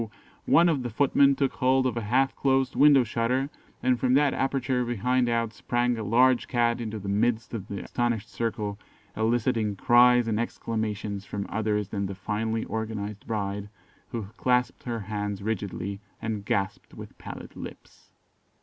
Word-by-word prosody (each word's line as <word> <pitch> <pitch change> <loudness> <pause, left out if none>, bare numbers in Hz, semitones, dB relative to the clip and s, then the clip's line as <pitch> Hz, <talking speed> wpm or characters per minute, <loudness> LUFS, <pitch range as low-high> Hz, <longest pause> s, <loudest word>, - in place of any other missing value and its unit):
one 170 +1 +6
of 155 -6 +1
the 120 - -3
footmen 140 +3 +4
took 135 -1 0
hold 130 +1 +2
of 130 - 0
a 115 - -2
half 130 +6 +1
closed 135 -1 +1
window 145 -3 +6
shutter, 125 +4 -1 0.3
and 125 -1 +2
from 130 0 +3
the 140 - +6
aperture 135 -2 +1
behind 120 +1 +1
out 115 -1 0
sprang 120 0 0
a 115 - -4
large 125 +4 +3
cat 120 -1 +1
into 110 -1 -4
the 100 -1 -7
midst 110 +3 0
of 105 -4 -5
the 100 - -5
astonished 120 -3 -1
circle, 105 -3 -3 0.4
eliciting 110 -1 +1
cries 120 +3 +5
and 110 -1 0
exclamations 110 -3 -3
from 100 -1 -5
others 105 -1 -1
than 100 -1 -2
the 95 - -6
finely 110 +3 -2
organised 105 -2 -4
bride, 100 -2 -3 0.4
who 115 -3 -4
clasped 125 -1 +1
her 120 -2 -3
hands 105 -1 -4
rigidly, 100 -2 -3 0.2
and 110 -3 -4
gasped 100 -1 -2
with - - -10
pallid - - -9
lips. - - -11
115 Hz, 160 wpm, -27 LUFS, 105-125 Hz, 0.4 s, one